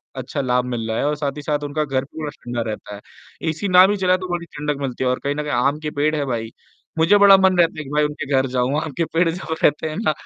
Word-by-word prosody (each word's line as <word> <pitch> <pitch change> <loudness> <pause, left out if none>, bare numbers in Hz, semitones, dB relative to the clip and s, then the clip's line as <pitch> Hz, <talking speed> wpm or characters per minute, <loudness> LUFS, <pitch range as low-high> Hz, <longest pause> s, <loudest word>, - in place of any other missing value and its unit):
अच्छा 130 +2 -4
लाभ 125 -1 +1
मिल 120 -3 -3
रहा 110 - -1
है - - 0
और 150 - 0
साथ 145 -1 -2
ही - - -5
साथ 145 0 -1
उनका 150 +1 -1
घर 135 -1 -1
पूरा 150 +1 -6
ठंडा 120 -4 -5
रहता 105 -1 -7
है। 100 - -11 0.5
एसी 155 +6 -3
ना 185 +1 +8
भी 205 0 0
चलाएँ 185 -1 +2
तो 185 - -5
बड़ी 175 -1 -3
ठंडक 150 -2 -4
मिलती 130 -1 -3
है 125 - +2
और 125 - 0
कहीं 140 +1 -1
न 150 - -2
कहीं 150 - -4
आम 140 +5 +1
के 155 -1 -4
पेड़ 155 +1 +2
है 145 -2 -1
भाई, 115 -3 -3 0.5
मुझे 170 +6 +5
बड़ा 200 -1 +8
मन 190 -1 +3
रहता 170 -2 +3
है - - -4
कि 135 - -11
भाई 150 +1 +1
उनके 150 -1 -3
घर 130 0 +3
जाऊँ, 130 +4 +1
आम 160 -2 -5
के 165 - +1
पेड़ 165 0 +3
जब 165 -1 -4
रहते 150 +1 +2
हैं 155 - -6
ना, 210 -8 +1
150 Hz, 295 wpm, -21 LUFS, 130-165 Hz, 0.5 s, ना